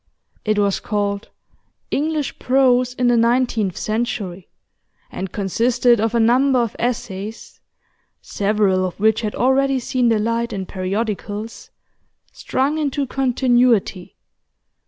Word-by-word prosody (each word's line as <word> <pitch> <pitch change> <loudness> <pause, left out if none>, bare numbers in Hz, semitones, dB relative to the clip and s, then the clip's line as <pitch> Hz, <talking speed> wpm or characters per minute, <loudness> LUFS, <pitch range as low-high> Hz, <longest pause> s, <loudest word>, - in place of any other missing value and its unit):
It 215 -1 0
was 200 -1 +1
called 205 -1 -2 0.6
'English 300 -1 -2
Prose 250 -1 +2
in 250 - 0
the 240 - +4
Nineteenth 235 -5 +1
Century,' 210 -5 -3 0.6
and 190 -1 -5
consisted 235 +4 +2
of 225 +1 0
a - - +3
number 255 +4 +3
of 235 -3 0
essays 220 -3 -4 0.6
(several 200 -2 0
of 185 0 -4
which 220 +2 +2
had 215 -2 -3
already 270 +1 +2
seen 250 -1 0
the 225 - +3
light 230 +2 -1
in 190 -1 -4
periodicals) 205 +3 -4 0.6
strung 285 +4 -1
into 285 -2 -1
continuity. 245 -7 +1
230 Hz, 115 wpm, -20 LUFS, 205-250 Hz, 0.6 s, the